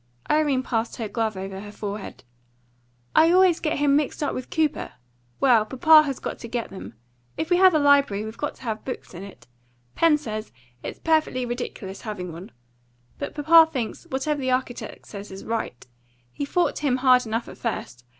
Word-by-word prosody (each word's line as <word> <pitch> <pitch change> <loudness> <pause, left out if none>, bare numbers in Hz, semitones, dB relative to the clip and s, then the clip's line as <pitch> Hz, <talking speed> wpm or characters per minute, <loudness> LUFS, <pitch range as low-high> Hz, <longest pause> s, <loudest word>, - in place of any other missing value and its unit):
Irene 295 -4 +2
passed 230 -2 -2
her 225 - -4
glove 220 -2 -2
over 190 0 -6
her 205 +1 -9
forehead. 205 -1 -7 0.9
"I 320 +1 +6
always 365 -2 +5
get 310 0 -1
him 285 -1 +3
mixed 295 +1 0
up 285 - -1
with 255 - -6
Cooper. 315 -2 -1 0.5
Well, 240 -5 +5
papa 305 +7 +6
has 275 -2 -3
got - - -6
to 235 - -7
get 235 0 -4
them. 190 -11 -9 0.4
If 320 +2 -3
we 355 - +5
have 370 -2 +6
a - - +6
library, 280 -8 +3
we - - -6
have 220 +1 -8
got 295 - -3
to - - -16
have 220 -3 -4
books 255 - -7
in 175 - -8
it. 200 0 -12 0.5
Pen 330 -2 +4
says 215 -6 -6 0.3
it's - - -6
perfectly 310 -6 +1
ridiculous 235 -5 -5
having 195 -6 -5
one. 175 +4 -9 0.7
But 285 - -5
papa 320 +2 +6
thinks 250 -7 -4
whatever 280 +2 -2
the 260 - -1
architect 255 -1 -3
says 200 -1 -9
is 190 0 -9
right. 225 - -4 0.5
He 285 - -3
fought 350 +5 0
him 280 -4 +1
hard 255 -2 +4
enough 225 +2 -2
at - - -11
first. 125 - -4
255 Hz, 190 wpm, -24 LUFS, 215-300 Hz, 0.9 s, I